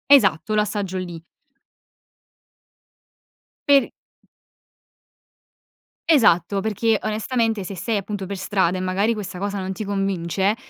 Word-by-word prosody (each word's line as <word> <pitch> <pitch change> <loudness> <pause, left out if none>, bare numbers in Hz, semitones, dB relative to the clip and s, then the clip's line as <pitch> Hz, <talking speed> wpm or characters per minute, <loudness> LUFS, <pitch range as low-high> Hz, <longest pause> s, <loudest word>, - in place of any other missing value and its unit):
Esatto, 215 - +5
l'assaggio 205 -3 -1
lì. 175 -3 -6 2.5
Per 280 -1 +5 2.2
Esatto, 200 - +4
perché 220 +1 +1
onestamente 220 0 0
se 190 +2 -6
sei 190 +6 -2
appunto 200 -1 -3
per 200 +2 -5
strada 190 -2 0
e - - -3
magari 195 +5 +1
questa 200 -4 -6
cosa 200 +1 -2
non 190 0 -3
ti 190 +3 -5
convince, 195 -1 0
200 Hz, 105 wpm, -22 LUFS, 185-215 Hz, 2.5 s, Esatto